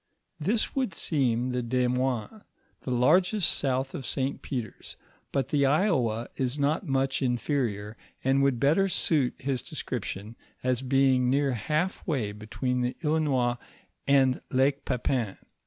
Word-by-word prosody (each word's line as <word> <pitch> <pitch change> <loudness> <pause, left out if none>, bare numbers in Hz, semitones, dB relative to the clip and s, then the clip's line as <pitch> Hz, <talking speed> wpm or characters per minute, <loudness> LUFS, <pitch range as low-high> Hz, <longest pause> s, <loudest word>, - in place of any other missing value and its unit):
{: - - -51
* - - -48
This 220 0 0
would 260 -7 0
seem 125 -5 0
the 125 0 -1
Desmoines, 125 - -1 0.4
the - - -7
largest 175 - +4
south 135 0 0
of 135 - -5
St. 130 +2 -2
Peter's, 120 -6 -6 0.4
but 135 -3 -1
the 140 -2 +3
Iowa 135 - +1
is 130 +1 -1
not 150 +5 0
much 135 0 0
inferior, 120 -5 -1 0.3
and 135 +1 +3
would 135 -3 +2
better 160 +9 +3
suit 150 -7 +2
his 135 -1 -2
description 115 - -5 0.3
as 130 -1 +1
being 130 -1 +3
near 140 +1 +2
half 155 - -1
way 130 - -1
between 125 +5 -3
the 125 0 -2
Illinois 140 -6 +1 0.5
and 135 -2 +3
Lake 135 +2 +1
Pepin. 125 -5 -1
130 Hz, 140 wpm, -27 LUFS, 125-145 Hz, 0.5 s, largest